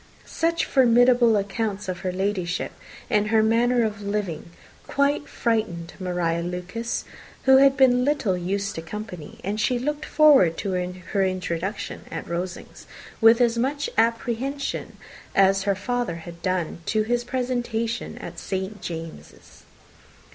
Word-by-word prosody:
Such 335 0 0
formidable 245 -3 +5
accounts 205 0 -2
of 185 -1 -3
her 185 - -2
Ladyship, 185 -2 -2 0.4
and 210 -3 +2
her 220 0 +3
manner 235 +2 +3
of 210 -2 -2
living, 200 -5 -3 0.4
quite 280 +1 +1
frightened 215 -8 -1
Maria 175 -2 -1
Lucas, 180 +7 -4 0.4
who 265 0 +7
had 275 0 +5
been 250 -2 +5
little 275 -9 +1
used 195 +3 -2
to 165 - -5
company; 180 -2 -8
and 205 +3 -2
she 245 +3 +1
looked 295 +4 -3
forward 280 - +5
to 195 - -3
her 180 +2 -2
introduction 185 +1 -3
at 165 - -6
Rosings 175 +1 -6 0.3
with 225 +1 +7
as 235 -1 +3
much 285 +4 -1
apprehension 235 +5 -1 0.4
as 195 0 +4
her 200 -1 +2
father 240 -2 -2
had 170 0 -10
done 185 -3 -1
to 215 -1 +2
his 240 +2 0
presentation 240 -2 -2
at - - -8
St. 190 +2 -4
James's. 165 -1 -9
210 Hz, 135 wpm, -24 LUFS, 185-245 Hz, 0.4 s, who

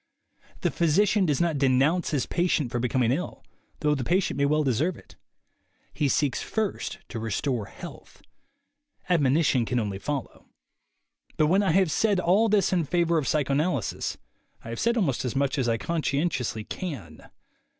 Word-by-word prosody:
The - - +1
physician 190 +4 +2
does 145 -3 +1
not 170 -4 +1
denounce 140 +6 +2
his 145 -5 0
patient 170 -8 0
for 120 - -1
becoming 125 -1 +1
ill, 165 +8 -3 0.4
though 150 -1 +2
the 135 -3 -2
patient 180 +5 +1
may 140 +1 +1
well 150 +1 +2
deserve 145 +7 0
it. - - -17 0.8
He 145 - 0
seeks 140 -2 +1
first 220 -3 -3
to 115 - -5
restore 115 +1 -2
health. - - -12 0.9
Admonition 145 -5 +3
can 125 +2 -1
only 100 -3 -3
follow. 140 +2 -5 0.9
But 155 - +4
when 195 - +4
I 190 -5 +2
have 190 -3 +3
said 205 +1 +2
all 195 +6 +3
this 200 -3 +2
in 175 -2 +2
favor 170 +1 +2
of 140 - -3
psycho 145 -3 +1
analysis, 145 - -1 0.5
I - - -9
have 115 - -5
said 235 +1 +1
almost 150 - 0
as 125 -1 -3
much 140 +1 0
as 125 -2 +1
I 115 - +1
conscien 160 +2 0
tiously 110 -7 -4
can. 115 - -7
150 Hz, 170 wpm, -26 LUFS, 130-175 Hz, 0.9 s, But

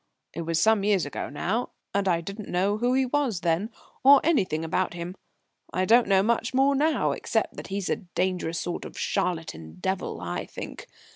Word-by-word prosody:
"It 170 - -4
was 165 -1 0
some 220 +1 +4
years 200 -5 +2
ago 145 - -5
now, 190 - -1 0.2
and 200 -1 +1
I 170 -2 +2
didn't 200 +4 -7
know 195 +4 +1
who 245 +2 +2
he 265 0 +3
was 250 -8 0
then, 170 +5 +1 0.3
or 275 +1 +9
anything 185 - +1
about 175 +2 -1
him. 175 +1 -5 0.6
I 185 - +1
don't 235 +4 +5
know 195 -1 +4
much 235 +3 0
more 270 +1 +4
now 300 +3 +2
except - - -1
that - - -7
he's 195 -1 -3
a - - +1
dangerous 180 -3 -2
sort 175 - -4
of - - -9
charlatan 80 - -2
devil, 190 - -2
I - - -4
think. - - -8
195 Hz, 190 wpm, -26 LUFS, 170-235 Hz, 0.6 s, or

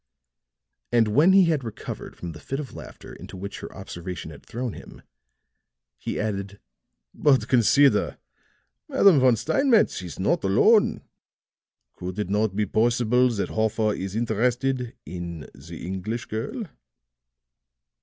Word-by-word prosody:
And 115 -3 +3
when 150 - +5
he 195 0 +7
had 155 -5 +1
recovered 110 -2 -7
from 85 - -7
the 80 - -11
fit 135 - -4
of 145 -4 -7
laughter - - -11
into - - -10
which 100 +2 -6
her - - -8
observation 90 -3 -7
had 75 - -13
thrown 120 -1 -4
him, - - -12 1.0
he - - -4
added: 100 -2 -3 0.5
"But 140 -3 +3
consider, 135 +3 +4 0.7
Madame 200 - +5
von 130 -2 +5
Steinmetz 225 - +2
is 90 -3 -8
not 95 - +1
alone. 205 - +4 0.9
Could 90 +1 -7
it 105 -3 -2
not 105 -1 +1
be 105 0 +1
possible 120 +4 +2
that 110 -4 -2
Hoffer 110 -1 0
is 95 0 -5
interested 125 +3 0
in 85 -2 -6
the - - -10
English 95 +6 -4
girl?" 115 - -4
110 Hz, 135 wpm, -25 LUFS, 95-130 Hz, 1.0 s, he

